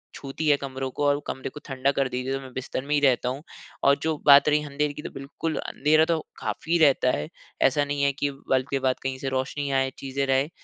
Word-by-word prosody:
छूती 140 +3 -5
है 145 - +6
कमरों 135 -1 -4
को 145 +3 -2
और 145 0 +3
कमरे 130 - -4
को 150 - -10
ठंडा 135 0 0
कर 135 -1 +2
देगी 125 +1 -3
तो 135 - -1
मैं 130 -1 -10
बिस्तर 130 0 -4
में 150 - -1
ही 145 - +4
रहता 130 -3 +3
हूँ। 135 +4 -5 0.4
और 140 0 +6
जो 160 -1 0
बात 145 +1 +8
रही 150 0 +3
अँधेरे 145 0 -2
की - - -8
तो - - -6
बिल्कुल 140 +4 -5
अँधेरा 155 +2 +2
तो 165 -1 +1 0.2
काफ़ी 170 +1 -1
रहता 135 -4 +4
है। 75 - -3 0.4
ऐसा 145 +2 +1
नहीं 145 0 -2
है 140 - +4
कि 140 +1 -1 0.2
बल्ब 130 0 +2
के 140 - 0
बाद 130 -1 +1
कहीं 135 0 -2
से 135 - -3
रोशनी 130 +2 -2
आए 135 -1 +2
चीज़ें 135 0 -2
रहे। 135 +3 +2
140 Hz, 245 wpm, -25 LUFS, 130-145 Hz, 0.4 s, बात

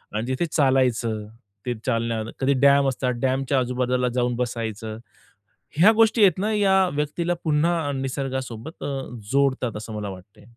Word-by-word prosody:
आणि 110 +3 -2
तिथे 130 +6 -1
चालायचं. 125 -6 +1 0.4
ते 125 - -1
चालणार, 115 -2 -1
कधी 135 +1 +2
डॅम 140 0 +5
असतात. 130 -1 -1
डॅमच्या 135 +1 +1
आजूबाजूला 125 0 0
जाऊन 125 -1 +1
बसायचं. 110 -3 -4 0.8
ह्या 190 +7 +7
गोष्टी 225 +1 +4
आहेत 185 -4 +5
ना, 210 +3 0
या 190 -2 +3
व्यक्तीला 150 +4 -1
पुन्हा 160 0 +1
निसर्गासोबत 130 0 -5
अ, 140 -1 -3 0.3
जोडतात 135 -5 +1
असं 110 +1 -7
मला 105 -1 -4
वाटते. 95 +2 -12
130 Hz, 140 wpm, -24 LUFS, 115-150 Hz, 0.8 s, ह्या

